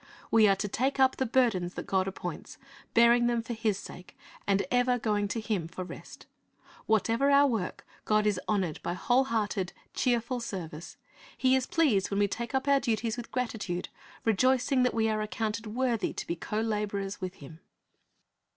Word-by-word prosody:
We 220 -2 +6
are 195 - +4
to 205 +2 -3
take 265 +7 -1
up 265 0 +4
the 260 - 0
burdens 220 -8 +1
that - - -5
God 190 -1 +1
appoints, 195 - -6 0.4
bearing 235 +1 +6
them 235 -1 0
for 235 - -4
His 220 -3 0
sake, 180 -2 -11 0.3
and 200 -1 +2
ever 245 0 +3
going 210 -3 0
to 225 - -3
Him 210 -7 -2
for 180 +2 -6
rest. 180 - -11 0.6
Whatever 225 +5 +2
our 280 0 +6
work, 225 -9 -2 0.2
God 215 0 +2
is 205 -3 +1
honored 190 -7 0
by 175 - -3
whole 250 +7 +2
hearted, 205 -6 -1 0.2
cheerful 245 0 0
service. 175 -8 -7 0.4
He 260 0 +4
is 260 -1 0
pleased 255 - +2
when 200 - -2
we 205 0 +3
take 235 +5 -4
up 265 +1 0
our 280 0 +5
duties 230 -3 -1
with 240 -2 -8
gratitude, 215 -8 -3 0.4
rejoicing 255 +4 +3
that 250 - +2
we 225 -1 +2
are 215 -1 0
accounted 215 +1 -3
worthy 235 0 -1
to - - -5
be 170 - -2
co 210 +5 -3
laborers 205 -3 -2
with 185 0 -4
Him. 150 +3 -12
220 Hz, 180 wpm, -29 LUFS, 200-245 Hz, 0.6 s, We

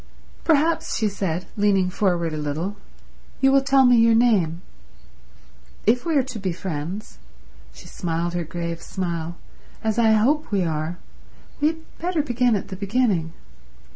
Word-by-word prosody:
"Perhaps," 325 +1 +2
she 220 - +1
said, 185 -3 -2
leaning 195 -3 +2
forward 175 -4 0
a - - -3
little, 155 +7 -3 0.6
"you 270 0 +4
will 275 0 +5
tell 270 0 +4
me 245 -1 +6
your 230 0 +5
name. 190 -8 +2 1.2
If 245 +8 +2
we 325 - +1
are 270 - +4
to 250 -4 -7
be 190 -2 -2
friends"—she 175 +3 -8
smiled 170 0 -2
her 175 -1 -1
grave 170 +1 -5
smile—"as 175 +5 -5
I 220 -1 +5
hope 270 +8 +2
we 195 -3 +2
are, 160 +1 -2 0.6
we 295 - +3
had 320 0 -5
better 340 -2 0
begin 245 -3 +2
at 200 - -4
the 190 - -5
beginning." 200 -5 0
200 Hz, 145 wpm, -23 LUFS, 170-245 Hz, 1.2 s, me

